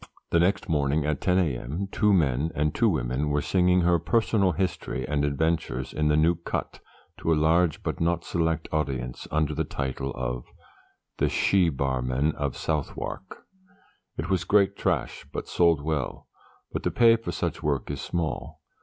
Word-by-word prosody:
The 85 - +4
next 95 +3 +1
morning, 75 -1 +1
at 75 -2 -1
10 90 -1 +2
a.m., 80 +2 -1
two 105 -2 +2
men 75 -4 +2
and 75 0 +1
two - - +3
women 65 +5 -1
were 75 0 +1
singing 90 +3 +3
her 85 0 +3
personal 100 0 +2
history 75 -8 -2
and 75 -1 0
adventures 70 -2 -1
in 75 0 0
the 75 0 +3
New 80 +3 +4
Cut, 85 - -4 0.4
to 85 - 0
a - - +5
large 80 +1 +2
but - - -3
not 85 0 +1
select 80 -1 -1
audience, 65 -5 -2
under 75 -1 0
the - - 0
title 65 0 -3
of - - -3 0.7
'The - - +2
She 95 -4 +3
Barman 65 0 0
of 70 -3 -3
Southwark.' 80 +4 -4 0.7
It 80 - -3
was 95 -2 +1
great 100 +1 +3
trash, 90 -11 -2
but - - -5
sold 85 -4 +3
well 75 -4 -3 0.4
but - - -3
the - - 0
pay 115 -1 +5
for 115 0 -5
such - - -3
work 70 -2 -1
is - - -4
small. 80 -8 -3
80 Hz, 170 wpm, -26 LUFS, 70-90 Hz, 0.7 s, a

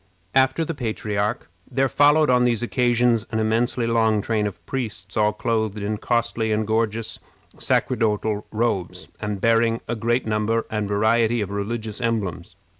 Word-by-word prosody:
After 135 +4 +3
the 165 - -3
patriarch, 110 -4 -2 0.2
there 135 0 +1
followed, 145 +1 +4
on 125 0 +4
these 120 -2 +1
occasions, 120 -2 +2
an 110 - -1
immensely 115 +2 +1
long 110 -2 +2
train 110 -2 0
of 85 -4 -9
priests, 125 -4 -5
all 105 -1 +3
clothed 110 -3 -1
in 105 +1 -3
costly 115 -2 0
and 110 0 +1
gorgeous 110 0 -1 0.4
sacerdotal 110 -3 0
robes, 110 -6 -2
and 105 -1 -3
bearing 115 +1 +2
a 120 - -2
great 120 +3 0
number 110 +1 0
and 105 -2 -1
variety 110 +3 +2
of 100 -2 -3
religious 105 +1 -4
emblems. 100 -7 -2
110 Hz, 150 wpm, -23 LUFS, 105-120 Hz, 0.4 s, followed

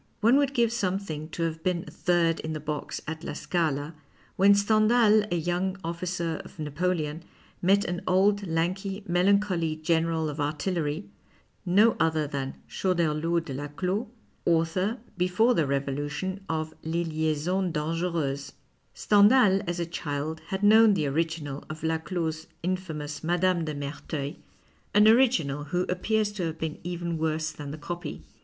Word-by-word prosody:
One 235 +5 +5
would 280 -1 +1
give 235 -2 +3
some 190 -5 0
thing 155 -6 -6
to 170 - -3
have 160 -1 -2
been 175 -1 -1
a - - -9
third 170 -1 +1
in 160 0 -4
the 155 - -3
box 150 0 -4
at 160 +1 -5
La - - -4
Scala 155 -3 -1 0.4
when 200 +1 +6
Stendhal, 215 +1 +4
a - - +2
young 175 +3 -1
olUcer 170 -1 -3
of - - -14
Napoleon, 155 0 -2 0.4
met 195 +3 +3
an 175 0 -3
old, 200 +2 +3
lanky, 190 +5 -1
melancholy 180 -2 +2
general 160 0 0
of 150 0 -5
artillery 155 +3 -2 0.3
— - - -40 0.2
no 230 -1 +4
other 160 -2 +2
than 140 -2 -4
Choderlos 170 -2 0
de 140 - -5
Laclos, 180 - -2 0.4
author, 170 +6 +1 0.2
before 185 +7 +3
the 165 -9 +2
Revo 140 0 -1
lution, 150 +7 -3
of 155 -1 -2
" - - -34
Les 165 +2 -1
Liaisons 160 +3 0
Dangercuses."' 155 -3 -2 0.4
Stendiial, 205 -1 +5
as 175 0 -2
a 170 - 0
child, 155 -1 -4
had 190 +1 -3
known 215 0 +7
the 155 -5 0
original 145 -1 -2
of 155 +1 -7
Laclos's 160 0 -2 0.2
infamous 160 -5 -3
Mme. 175 +2 +1 0.3
dc 155 -2 -4
Mcrtcuil, 145 0 -5 0.6
an 210 +1 +7
original 220 - +3
who 175 +5 0
appears 210 +3 0
to 190 -5 -2
have 160 0 -5
been 160 -1 -4
even 170 -1 -3
worse 155 0 -1
than 145 -2 -8
the 150 - -6
copy. 165 - -6
170 Hz, 155 wpm, -27 LUFS, 155-190 Hz, 0.6 s, known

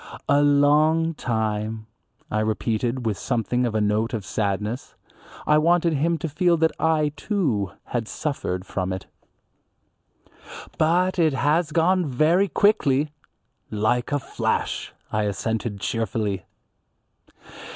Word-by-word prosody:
"A 145 - +4
long 150 +3 +4
time," 110 -4 -2 0.5
I 105 - +1
repeated 115 +3 -1
with 105 -3 -1
something 120 0 0
of 110 - -4
a 110 - +2
note 105 +3 +1
of 105 -4 -5
sadness. 105 +5 -2 0.5
I 150 0 +4
wanted 170 +1 +3
him 165 +4 +1
to 160 - -3
feel 170 +3 +2
that 160 0 +3
I, 155 -2 +2
too, 140 - -1
had 115 -3 -3
suffered 105 -13 -3
from 95 -1 -3
it. 95 - -6 1.7
"But 180 +4 +2
it 160 -3 +3
has 150 +5 +1
gone 175 +2 +2
very 155 +9 +3
quickly." 150 -9 +2 0.6
"Like 110 +3 0
a 145 - +2
flash," 135 - -2 0.2
I 105 0 0
assented 105 +1 -2
cheerfully. 105 -3 -2
130 Hz, 120 wpm, -24 LUFS, 110-160 Hz, 1.7 s, A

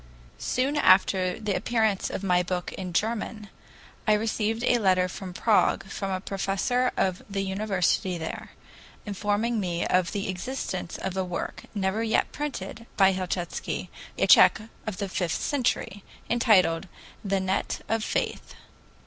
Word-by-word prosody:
Soon 270 +4 0
after 185 -5 +4
the 210 -2 -1
appearance 220 -2 +1
of - - -4
my 180 -2 +3
book 180 0 -3
in 185 -2 -5
German, 215 +2 -2 0.6
I 215 - +6
received 220 +1 0
a 245 -1 +3
letter 185 -3 +3
from 185 +1 -7
Prague, 210 +3 +2
from 195 - -3
a 185 -1 -1
professor 200 +6 0
of 185 -1 +1
the 195 -1 -1
university 190 -2 0
there, 160 -1 -6 0.6
informing 210 +3 0
me 175 -3 -1
of 180 -1 +2
the 200 -1 -2
existence 185 -1 -4
of 190 -1 -4
a 190 - 0
work, 180 -2 -5
never 195 +2 0
yet 225 -1 +1
printed, 230 -6 -5
by 195 -1 +6
Helchitsky, 185 -1 -3 0.3
a - - +3
Tsech - - +7 0.3
of 205 -4 -3
the 200 -1 -2
fifteenth 180 -3 -1
century, 240 -7 -1 0.3
entitled 195 -7 +3 0.4
"The 195 -1 +1
Net 190 +1 -1
of 225 -1 0
Faith." - - -2
195 Hz, 145 wpm, -27 LUFS, 185-220 Hz, 0.6 s, Tsech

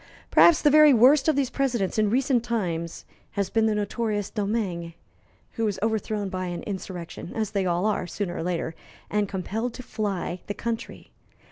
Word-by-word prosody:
Perhaps 340 -3 +6
the 295 - +5
very 305 -2 +7
worst 265 +5 +6
of 315 - +4
these 270 -2 0
presidents 240 -8 0
in 215 -1 +3
recent 250 0 +2
times 175 -8 -3 0.3
has 200 -2 -1
been 225 -1 +3
the 215 - +1
notorious 210 0 -2
Domingue, 200 -6 -2 0.6
who 225 - -2
was 205 -2 -1
overthrown 215 -2 -1
by 185 -1 -3
an 175 -1 -5
insurrection, 185 -3 -6
as 215 -2 -1
they 195 -2 0
all 175 +2 +1
are 210 -4 0
sooner 175 -1 -4
or - - -3
later, 165 -1 -2 0.4
and 210 -1 +1
compelled 220 +5 -3
to 255 - -8
fly 195 -6 -3
the 205 - -3
country. 230 -1 -5
210 Hz, 175 wpm, -25 LUFS, 185-235 Hz, 0.6 s, very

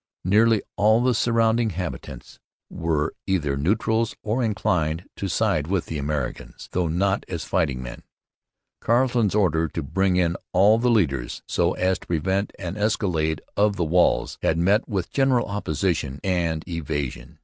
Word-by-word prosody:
Nearly 110 +3 +4
all 110 +3 +4
the 125 0 +3
surrounding 115 0 +2
habitants 90 -9 -7 0.3
were 80 -4 -1
either 75 -8 0
neutrals 110 +8 0
or 110 +4 0
inclined 90 -7 0
to 100 - -3
side 75 -4 0
with 95 -1 0
the 80 - -4
Americans, 70 -2 -4
though 90 -2 0
not 95 +5 0
as 85 -3 -4
fighting 75 -9 0
men. - - -8 0.8
Carleton's 120 -3 +2
order 85 -6 +2
to 80 +1 -5
bring 95 +5 +1
in 85 -2 +1 0.2
all 105 +4 +5
the 125 +1 +2
ladders, 70 - 0
so - - +1
as 95 0 0
to - - -16
prevent 95 +5 0
an 90 +1 -5
escalade 90 -7 0
of 105 0 +2
the 90 -3 -1
walls, 90 +3 +2
had 80 - +1
met 100 +8 +2
with 95 -5 -2
general 135 -3 +2
opposition 85 -7 -2
and 85 -4 -1
evasion. 75 -6 -4
90 Hz, 150 wpm, -24 LUFS, 80-105 Hz, 0.8 s, all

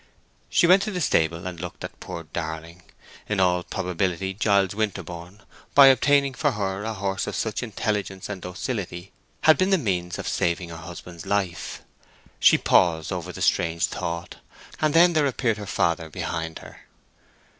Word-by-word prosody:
She - - +4
went 185 +3 +6
to 215 - -2
the 185 -4 -3
stable 85 - +1
and 90 -2 -5
looked 90 0 -7
at - - -8
poor 85 - -7
Darling: 80 +1 -6 0.5
in 105 -2 0
all 90 -1 +3
probability 90 +1 -2
Giles 100 -2 +2
Winterborne, 100 -2 -4 0.3
by 140 -1 +10
obtaining 140 +1 +3
for 145 +1 0
her 100 -1 -2
a 110 0 -3
horse 95 0 -2
of - - -3
such 110 -2 -2
intelligence 105 -4 -3
and 100 -3 -6
docility, 90 -1 -5 0.3
had 155 -2 +6
been 185 - +3
the 195 - +4
means 90 - -2
of - - -5
saving 85 0 0
her 80 - -8
husband's 85 0 -10
life. 95 -4 -2 0.6
She - - +6
paused 80 -3 +3
over - - -4
the - - -5
strange 85 -1 +2
thought; 85 +1 -5 0.4
and 155 0 +1
then 175 +1 +6
there 155 -3 +3
appeared 120 -4 0
her 105 - -7
father 85 -2 0
behind 80 -1 -4
her. - - -14
95 Hz, 165 wpm, -25 LUFS, 85-110 Hz, 0.6 s, by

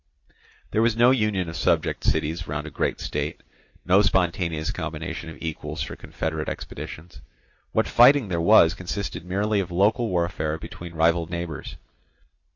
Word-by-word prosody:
There 110 - +2
was 115 -1 +2
no 120 +2 +6
union 105 -7 +1
of 80 - -6
subject - - 0
cities 80 +3 0
round 75 +1 -3
a 80 - -7
great - - -1
state, - - -4 0.4
no 95 +2 +5
spontaneous 85 -5 0
combination 85 - -5
of 80 - -10
equals 80 -2 -4
for - - -6
confederate 80 -1 -4
expeditions; 80 -5 -8 0.5
what - - +1
fighting 125 0 +6
there 85 -3 -1
was 85 -3 +6
consisted 90 -2 -5
merely 100 +4 0
of 95 - -2
local 105 +6 +2
warfare 85 -3 -1
between 85 +1 -9
rival 85 +1 +2
neighbours. 85 -4 -5
85 Hz, 150 wpm, -24 LUFS, 80-100 Hz, 0.5 s, no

